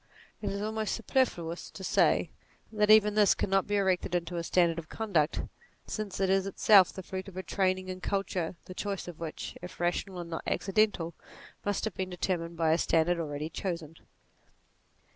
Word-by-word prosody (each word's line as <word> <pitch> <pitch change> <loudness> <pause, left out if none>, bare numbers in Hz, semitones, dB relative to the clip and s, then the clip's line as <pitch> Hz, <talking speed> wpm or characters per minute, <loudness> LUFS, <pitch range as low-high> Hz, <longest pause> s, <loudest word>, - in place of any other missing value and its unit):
It 205 - -2
is 200 +1 -3
almost 220 0 -1
superfluous 185 -9 -1
to 190 - -10
say - - +3 0.4
that 210 -1 +1
even 210 -1 +7
this 210 -1 +5
cannot 195 0 +1
be 205 - 0
erected 190 -3 +1
into 175 0 -2
a 170 - -2
standard 170 -1 +2
of 160 - -10
con 220 -2 -5
duct, 155 -2 +2 0.4
since 210 -3 -4
it 195 - +2
is 195 0 +2
itself 195 -1 +6
the 190 - -8
fruit 190 +1 -6
of 190 -2 -10
a 185 - -3
training 185 -1 0
and 185 0 -6
culture 185 -3 -2
the 185 - -8
choice 200 0 -4
of 175 -2 -8
which, 165 -2 -6
if 180 0 -9
rational 175 +2 -1
and 170 -1 -6
not 165 - -4
accidental, 195 -4 +1 0.5
must 205 +1 -1
have 220 - -2
been 185 +1 -3
determined 170 -2 -2
by 160 -1 +3
a 165 - +3
standard 170 +2 +2
already 150 -1 -3
chosen. 170 -4 -4
185 Hz, 185 wpm, -30 LUFS, 170-200 Hz, 0.5 s, even